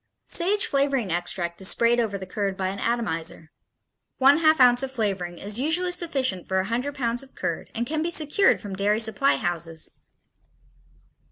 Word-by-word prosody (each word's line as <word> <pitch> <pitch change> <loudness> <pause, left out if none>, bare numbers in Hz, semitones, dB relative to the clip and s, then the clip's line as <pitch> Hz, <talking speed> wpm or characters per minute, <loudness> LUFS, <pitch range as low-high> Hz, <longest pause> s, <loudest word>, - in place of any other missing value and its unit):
Sage 390 +4 +4
flavoring 275 -7 0
extract 175 0 -1
is 190 - +1
sprayed 235 +3 +2
over 215 -4 -1
the 190 - -8
curd 195 +1 -3
by 190 -1 -1
an 195 +1 -6
atomizer. 165 -9 -3 0.7
One 275 +3 +5
half 315 -2 +3
ounce 245 -1 +6
of 270 -1 -4
flavoring 195 -8 -3
is 205 +5 0
usually 335 +6 +1
sufficient 270 - -1
for 190 - -1
a 190 - -1
hundred 250 +7 -3
pounds 240 -3 -1
of 270 -1 -12
curd - - -4
and 235 +1 -1
can 310 +4 -2
be 335 - -1
secured 325 +4 +2
from 200 -3 -7
dairy 205 +2 +1
supply 230 +5 +2
houses. 165 -3 -3
230 Hz, 175 wpm, -24 LUFS, 190-275 Hz, 0.7 s, ounce